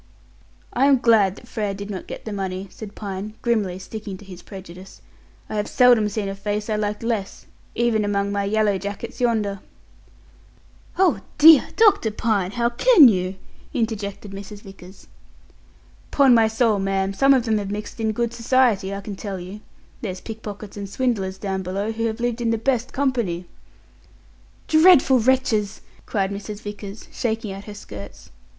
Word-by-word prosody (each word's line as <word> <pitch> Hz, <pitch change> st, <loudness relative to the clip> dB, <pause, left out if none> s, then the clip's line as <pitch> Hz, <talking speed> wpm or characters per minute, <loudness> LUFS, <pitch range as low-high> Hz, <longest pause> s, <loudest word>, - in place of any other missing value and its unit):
"I 265 Hz, +3 st, +3 dB
am 275 Hz, -1 st, +5 dB
glad 220 Hz, -6 st, +3 dB
that 240 Hz, -, -15 dB
Frere 210 Hz, -4 st, -3 dB
did 200 Hz, +1 st, -7 dB
not 190 Hz, -, -6 dB
get -, -, -8 dB
the 215 Hz, -, -4 dB
money," 190 Hz, -1 st, -4 dB
said 210 Hz, -2 st, -10 dB
Pine, 205 Hz, +1 st, -6 dB
grimly 210 Hz, -7 st, 0 dB
sticking 200 Hz, 0 st, -7 dB
to 205 Hz, -, -15 dB
his 185 Hz, -2 st, -11 dB
prejudice; 190 Hz, -1 st, -11 dB, 0.5 s
"I 215 Hz, -, -4 dB
have 210 Hz, -, -1 dB
seldom 240 Hz, -4 st, +4 dB
seen 205 Hz, -1 st, -3 dB
a 195 Hz, -, -3 dB
face 205 Hz, +2 st, -3 dB
I -, -, +1 dB
liked 210 Hz, +1 st, -2 dB
less, 225 Hz, -4 st, -3 dB, 0.3 s
even 230 Hz, -2 st, +1 dB
among 200 Hz, -1 st, 0 dB
my 200 Hz, 0 st, -1 dB
yellow 205 Hz, -1 st, +1 dB
jackets 205 Hz, +6 st, -6 dB
yonder." 215 Hz, -5 st, 0 dB, 1.4 s
"Oh 370 Hz, -3 st, +3 dB, 0.2 s
dear, 310 Hz, -1 st, +8 dB
Dr. 410 Hz, -, +4 dB
Pine! 210 Hz, -3 st, 0 dB
How 235 Hz, -1 st, +1 dB
can 305 Hz, -, +7 dB
you?" 185 Hz, -2 st, -1 dB, 0.4 s
interjected 210 Hz, -3 st, -3 dB
Mrs. 200 Hz, +1 st, -9 dB
Vickers. 195 Hz, -1 st, -14 dB, 1.0 s
"'Pon 275 Hz, -3 st, +5 dB
my 225 Hz, -2 st, +5 dB
soul, 220 Hz, -2 st, +1 dB
ma'am, 195 Hz, 0 st, -1 dB
some 275 Hz, +6 st, +5 dB
of 250 Hz, -2 st, +1 dB
them 220 Hz, -2 st, +1 dB
have 200 Hz, -1 st, -5 dB
mixed 210 Hz, +2 st, -6 dB
in 220 Hz, -1 st, 0 dB
good 235 Hz, +1 st, -2 dB
society, 230 Hz, -5 st, +2 dB
I 200 Hz, -, -5 dB
can 200 Hz, 0 st, -7 dB
tell 195 Hz, -1 st, -5 dB
you. 185 Hz, +4 st, -8 dB, 0.4 s
There's 185 Hz, -5 st, -4 dB
pickpockets 210 Hz, -1 st, -8 dB
and 200 Hz, -1 st, -6 dB
swindlers 200 Hz, -5 st, -1 dB
down 190 Hz, -1 st, -3 dB
below 195 Hz, +4 st, -3 dB
who 225 Hz, +1 st, -2 dB
have 220 Hz, 0 st, -4 dB
lived 240 Hz, 0 st, -1 dB
in 230 Hz, -, 0 dB
the 225 Hz, -, +1 dB
best 250 Hz, +1 st, -1 dB
company." 235 Hz, -11 st, -1 dB, 1.2 s
"Dreadful 315 Hz, -5 st, +6 dB
wretches!" 230 Hz, -4 st, +1 dB, 0.3 s
cried 195 Hz, -2 st, -1 dB
Mrs. 205 Hz, +1 st, -6 dB
Vickers, 205 Hz, 0 st, -8 dB
shaking 220 Hz, -2 st, -2 dB
out 195 Hz, +1 st, -8 dB
her 210 Hz, -, -9 dB
skirts. 100 Hz, -, -11 dB
210 Hz, 170 wpm, -22 LUFS, 195-235 Hz, 1.4 s, dear